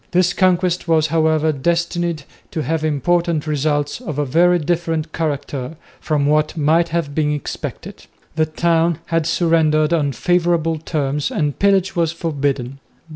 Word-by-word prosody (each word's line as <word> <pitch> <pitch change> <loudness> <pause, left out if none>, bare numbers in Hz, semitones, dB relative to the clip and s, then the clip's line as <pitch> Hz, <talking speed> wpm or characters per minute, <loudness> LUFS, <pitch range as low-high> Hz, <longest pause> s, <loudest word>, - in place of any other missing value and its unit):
This 180 -1 +2
conquest 180 -1 +1
was, 160 -2 +3
however, 160 -1 +2
destined 170 +2 -1 0.3
to 155 - -3
have 160 +1 -1
important 160 +2 0
results 145 - -1
of 155 - -5
a 145 - 0
very 175 +6 +3
different 165 -1 -2
character 145 -3 -3 0.2
from 150 -3 0
what 150 +2 +1
might 160 +3 +2
have 160 -3 -2
been 150 0 +1
expected. 145 - -6 0.3
The 155 -1 +1
town 165 +1 +1 0.2
had 165 -1 +1
surrendered 160 -2 +2
on 145 -4 +1
favourable 170 -2 +1
terms 150 -2 -2
and 145 -2 -2
pillage 195 -2 +2
was 165 -2 +1
forbidden. 140 -5 -2
160 Hz, 140 wpm, -19 LUFS, 150-170 Hz, 0.3 s, was